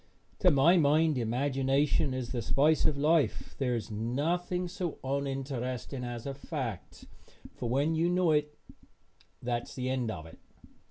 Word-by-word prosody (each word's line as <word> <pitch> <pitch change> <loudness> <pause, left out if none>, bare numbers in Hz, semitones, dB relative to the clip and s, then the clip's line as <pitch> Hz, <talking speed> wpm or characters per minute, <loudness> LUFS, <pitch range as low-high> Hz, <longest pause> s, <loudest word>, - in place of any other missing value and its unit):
To 185 - +5
my 160 +4 +5
mind 155 0 +4
imagination 135 +4 +1
is 130 -2 -4
the 125 -2 -2
spice 150 +7 +3
of 145 - +2
life. 155 +1 +1
There 125 -3 +1
is 115 -1 -5
nothing 165 - -1
so 175 -2 -4
uninteresting 135 -2 -3
as 120 -1 -5
a 140 - -3
fact, 135 - -6 0.5
for 120 - -4
when 140 +6 +2
you 165 +2 +2
know 180 -2 +3
it 150 0 0 0.9
that 120 -1 -2
is - - -11
the 130 0 -2
end 125 -3 -1
of 80 -7 -5
it. 80 - -14
135 Hz, 155 wpm, -30 LUFS, 125-155 Hz, 0.9 s, To